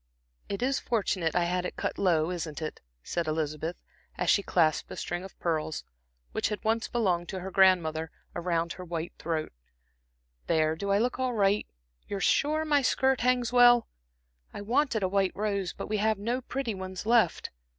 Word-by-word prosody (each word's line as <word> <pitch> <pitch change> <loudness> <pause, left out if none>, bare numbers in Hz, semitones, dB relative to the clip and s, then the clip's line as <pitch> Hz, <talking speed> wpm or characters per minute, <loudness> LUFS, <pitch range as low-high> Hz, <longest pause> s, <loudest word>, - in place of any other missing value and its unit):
"It 200 +4 -2
is 270 +1 +1
fortunate 190 -7 0
I 175 - +3
had 180 +1 0
it 180 - -4
cut - - -3
low, 170 -3 +2
isn't 160 -4 -4
it," 155 -1 -5 0.2
said 170 -2 -2
Elizabeth, 155 +2 -2 0.4
as - - +2
she 200 - +4
clasped 160 -5 +1
a - - -6
string 175 +1 -4
of 190 - -11
pearls, 155 -2 -2 0.5
which - - 0
had 210 - -4
once 225 +1 +1
belonged 180 -7 0
to 190 - -4
her 190 +1 -6
grandmother, 170 -5 +3 0.2
about 170 -1 -1
her 185 - -9
round - - -17
white 170 0 -3
throat. 160 -1 -2 1.0
"There, 155 -1 +2
do 200 +5 -4
I 200 - +4
look 245 +4 0
all 255 -1 0
right? 205 -1 +2 0.4
You're 200 - -3
sure 305 +9 +2
my 295 -2 +3
skirt 265 0 +2
hangs 245 0 +1
well? 245 -1 +6 0.6
I - - -7
wanted 235 0 +1
a - - +3
white 195 0 +1
rose, 200 -3 -1
but - - -7
we 215 - 0
have 215 +1 +2
no 235 +6 -2
pretty 255 -2 -3
ones 190 0 -6
left." 225 -6 +2
195 Hz, 185 wpm, -29 LUFS, 170-230 Hz, 1.0 s, well